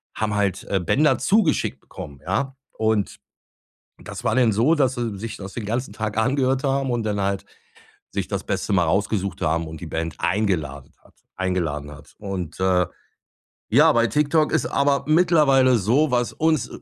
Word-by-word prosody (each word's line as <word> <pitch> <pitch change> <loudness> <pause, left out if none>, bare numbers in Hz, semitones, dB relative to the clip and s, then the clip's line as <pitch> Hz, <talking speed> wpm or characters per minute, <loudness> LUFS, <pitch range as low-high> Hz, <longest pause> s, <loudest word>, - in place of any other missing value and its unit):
haben 110 -1 -1
halt, 100 -2 -1
äh, 95 - +2
Bänder 145 - +2
zugeschickt 195 -7 +1
bekommen, 70 -1 -10
ja? 130 +9 -1 0.2
Und 110 -2 0 0.8
das - - -9
war - - +1
denn 125 -3 +4
so, 120 +10 +3
dass 135 -5 +1
sie 115 -4 -3
sich 110 +1 -6
das 95 -1 -8
den 115 - -5
ganzen 120 +1 -2
Tag 110 0 -3
angehört 130 +2 +1
haben 135 -1 0
und 120 -2 -1
dann 105 -2 -1
halt 100 0 -1 0.7
sich - - -3
das - - -3
Beste - - -2
mal 90 -3 +3
rausgesucht 100 +2 -1
haben 80 +1 0
und 80 +1 -9
die - - -6
Band 80 0 -3
eingeladen 85 -9 -1
hat - - -23 0.2
eingeladen 80 -6 -2
hat. 75 +1 -14
Und, 95 -5 -5
äh, 90 -2 +2 0.8
ja, 150 +7 +6
bei 120 -3 +3
TikTok 150 +5 +2
ist - - +1
aber 140 0 +1
mittlerweile 150 -6 +4
so, 125 +10 +2
was 120 -1 0
uns, 155 -4 +1
110 Hz, 170 wpm, -23 LUFS, 95-135 Hz, 0.8 s, ja